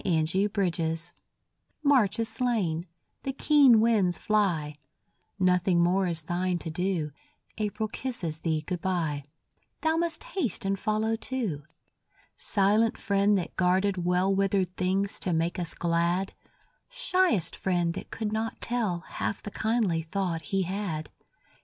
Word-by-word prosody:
GOD 160 -4 +2
SPEED 195 +4 +1 0.2
TO 165 - -2
THE 160 0 0
SNOW 165 +2 -7 0.7
March 260 -9 +4
is 230 -1 0
slain; 220 -8 0 0.3
the 270 - -2
keen 275 -5 +6
winds 210 -7 +3
fly; 180 -9 +1 0.6
Nothing 180 -2 +3
more 185 +2 +2
is 165 -2 -2
thine 175 +2 -1
to 165 -1 -6
do; 175 -3 -1 0.5
April 215 +1 -1
kisses 210 -10 -4
thee 155 -2 -1
good 180 -1 -3
bye; 160 -7 -1 0.6
Thou 320 0 +2
must 340 +4 -1
haste 375 - -2
and 195 0 0
follow 215 +2 0
too; 225 - -3 0.7
Silent 210 +2 +2
friend 200 0 +2
that 180 - -4
guarded 185 0 +2
well 180 +2 +2
Withered 195 -2 +1
things 195 +2 0
to 180 - -1
make 165 +2 0
us 175 - -3
glad, 170 +2 0 0.6
Shyest 370 - +1
friend 175 -3 0
that - - -7
could 215 -1 -3
not 220 +1 -2
tell 215 -8 -1
Half 200 - -4
the 205 - -6
kindly 220 -8 +1
thought 170 0 -2
he 195 +4 0
had. 180 -5 -4
190 Hz, 145 wpm, -28 LUFS, 170-220 Hz, 0.7 s, keen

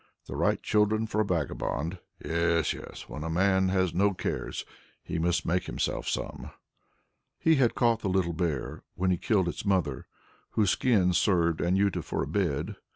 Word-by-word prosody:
The - - -7
right - - +1
children 110 +1 +2
for 110 -1 0
a - - +3
vagabond. 85 -1 -2 0.3
Yes, 85 -1 +1
yes, - - -10
when 75 - -6
a 80 - -3
man 95 +2 +3
has 95 -2 +1
no 100 +2 +2
cares, - - -3 0.4
he 85 - -3
must 85 -1 +1
make 90 +2 0
himself - - -2
some." - - -3 0.9
He 160 -1 +3
had 125 -4 +3
caught 115 -2 +3
the 100 - -2
little 90 -2 +1
bear, 80 -4 -2
when 95 0 +1
he 90 - +2
killed 95 -1 +1
its 85 - -4
mother, 90 - 0 0.5
whose 105 -4 +3
skin 100 -8 +3
served 85 -2 +2
Anjuta 95 +2 +2
for - - -2
a - - -4
bed. 80 -4 -1
90 Hz, 170 wpm, -28 LUFS, 85-100 Hz, 0.9 s, a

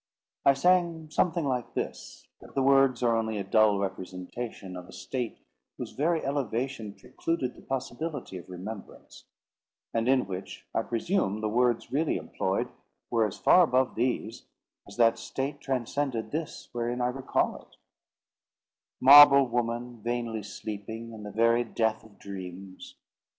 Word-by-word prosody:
I 140 - +6
sang 170 0 +2
something 170 0 +1
like 125 -3 -2
this: - - -5
but - - -15
the 135 - +2
words 135 -2 +4
are 115 -1 +3
only 110 -1 -1
a 100 - -2
dull 105 0 +4
representation 95 +1 -5
of 90 0 -8
a - - -13
state 125 -3 -4 0.4
whose - - -6
very 160 +3 0
elevation 130 -5 -2
precluded 130 +1 -3
the - - -16
possibility 135 - -4
of 90 - -14
remembrance; 95 +4 -9 0.7
and 115 +1 0
in 130 -1 +4
which 95 0 -7
I - - +1
presume 115 - -1
the 110 - 0
words 120 +1 +1
really 150 +4 +1
employed - - -2 0.4
were 115 -2 +3
as 100 - -8
far 180 - +6
above 130 -6 +2
these, 115 -2 -2 0.4
as 100 - -12
that 115 -1 +4
state 140 +2 -4
transcended 130 -3 -2
this 155 +1 -5
wherein 120 0 -2
I 125 0 +1
recall 130 +1 -1
it: - - -24 1.2
"Marble 140 0 +9
woman, 120 0 -2
vainly 120 -1 -2
sleeping 110 +3 -7
In 110 - -9
the 105 0 -7
very 115 +3 +3
death 110 -1 -1
of 105 -3 -18
dreams! 95 -1 -9
120 Hz, 145 wpm, -28 LUFS, 110-135 Hz, 1.2 s, Marble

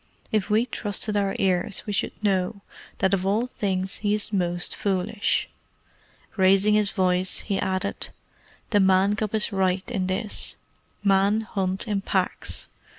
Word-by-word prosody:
If 215 -2 0
we 220 +3 +3
trusted 210 -3 0
our 200 -1 +1
ears 190 +2 0
we 210 - -3
should 200 - -3
know 195 0 0 0.4
that 190 0 +2
of 190 -2 +1
all 205 +5 +1
things 190 -6 -2
he 205 0 +1
is 215 0 -3
most 175 -2 -1
foolish." 200 +1 0 0.9
Raising 195 +1 +4
his 210 -1 +3
voice, 185 -1 +1
he 200 -3 -2
added, 190 0 -2 0.6
"The 205 - +4
Man 190 +1 +4
cub 215 0 -2
is 215 +1 0
right 190 -1 0
in 185 -2 -1
this. 205 +3 0 0.5
Men 200 +2 +3
hunt 195 -1 -2
in 205 -2 0
packs. 190 -1 -1
195 Hz, 150 wpm, -25 LUFS, 190-210 Hz, 0.9 s, Raising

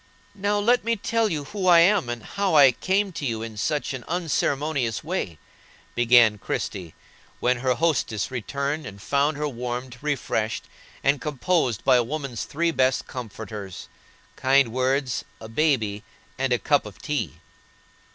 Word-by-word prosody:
"Now 205 +1 0
let 240 +4 +3
me 230 0 +1
tell 225 +1 0
you 155 -5 -2
who 190 +5 -3
I 170 -2 +8
am, 185 -6 +3
and 120 -1 -4
how 200 -4 -1
I 140 -3 +8
came 190 - 0
to 165 - -6
you 115 -4 -2
in 115 -1 -7
such 145 +7 -1
an 130 -2 -6
unceremonious 150 -6 -1
way," 150 - -3 0.6
began 120 -3 +5
Christie, 90 -4 -4 0.4
when 125 0 +2
her 125 +1 +1
hostess 130 - 0
returned 140 +4 -3
and 100 0 -10
found 140 +7 +1
her 150 0 -1
warmed, 125 -1 -5
refreshed, 125 -7 -1 0.4
and 140 +1 +2
composed 150 - 0
by 130 -2 +6
a 120 - +3
woman's 135 -2 -4
three 170 +3 0
best 130 -4 +1
comforters,—kind 115 +3 -3
words, 130 0 0 0.2
a 110 - -9
baby, 115 -5 +1 0.3
and 135 0 -1
a 125 - +4
cup 145 -2 +1
of 100 - -12
tea. 150 -1 -2
135 Hz, 150 wpm, -25 LUFS, 120-160 Hz, 0.6 s, I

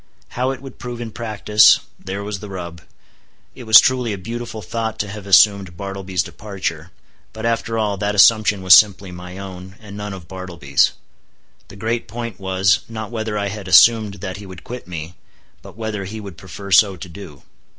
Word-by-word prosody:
How 125 +2 -1
it 135 0 -5
would 135 -2 -11
prove 120 -1 -6
in 115 -2 -6
practice—there 105 -3 +2
was 105 -1 -5
the 105 - -9
rub. 85 -3 -7 0.7
It 125 - -11
was 110 -1 +10
truly 125 -4 +1
a - - -4
beautiful 115 +2 -6
thought 110 -2 -3
to 105 - -2
have 100 0 -9
assumed 100 -2 +4
Bartleby's 95 -2 -3
departure; 90 -5 -6 0.4
but, 110 +1 -6
after 115 -1 -1
all, 105 -3 -1
that 105 +1 -1
assumption 105 0 +5
was 95 -1 +7
simply 100 -3 +5
my 90 +1 -9
own, 95 -1 -9
and 100 -2 -11
none 105 -1 -5
of 85 -4 -12
Bartleby's. 85 -7 0 0.7
The - - -13
great 115 +3 -3
point 115 -3 -6
was, 95 0 +2
not 110 -1 -6
whether 110 -2 -3
I 100 -1 -1
had 100 -2 -7
assumed 105 +3 +6
that 95 -1 -5
he 100 0 -10
would 95 -2 -11
quit 125 -4 -8
me, 85 -1 -7 0.5
but - - -14
whether 110 -3 -4
he 110 +4 -7
would 100 -4 -9
prefer 95 +3 -10
so 100 0 +5
to 90 - -9
do. 85 -5 -12
100 Hz, 185 wpm, -20 LUFS, 95-110 Hz, 0.7 s, was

